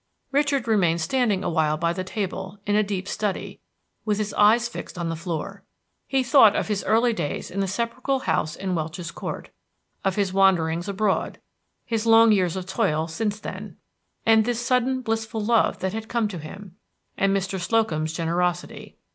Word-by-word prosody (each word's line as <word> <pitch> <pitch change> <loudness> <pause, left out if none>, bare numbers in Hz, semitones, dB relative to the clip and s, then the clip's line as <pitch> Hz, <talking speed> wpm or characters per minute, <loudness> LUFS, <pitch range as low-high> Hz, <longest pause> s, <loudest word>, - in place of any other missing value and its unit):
Richard 280 -3 +1
remained 175 -7 +2
standing 210 +2 +1
awhile 155 -2 +1
by 170 +1 0
the 185 - -3
table, 190 0 -4
in 205 - +1
a 215 - +5
deep 195 -2 -3
study, 205 -2 -3 0.4
with 210 -2 0
his 210 -1 -2
eyes 225 +3 +4
fixed 235 - -8
on 170 -1 -2
the 165 - -2
floor. 175 +4 -5 0.4
He 270 -1 +1
thought 240 -5 +6
of - - -1
his 205 -2 -1
early 230 +3 +3
days 145 -9 -4
in 195 - -4
the 195 - +1
sepulchral 235 +6 -2
house 155 - -1
in 190 -1 -3
Welch's 170 +1 -4
Court, - - -6 0.5
of 195 -1 0
his 195 -3 0
wanderings 175 -2 +2
abroad, 200 0 -1 0.5
his 225 -1 -2
long 225 0 +7
years 185 -4 +2
of 185 -1 -4
toil 185 -6 0
since 205 +5 -2
then, - - -8 0.5
and 225 -1 +5
this 240 0 -1
sudden 255 +1 +1
blissful 225 -2 -2
love 230 0 +3
that 190 0 -1
had 220 0 -5
come 235 -2 +1
to 180 -4 -6
him, 190 +4 -10 0.4
and 195 0 +2
Mr. 190 0 -3
Slocum's 175 -6 0
generosity. 175 +2 -2
200 Hz, 175 wpm, -24 LUFS, 175-225 Hz, 0.5 s, long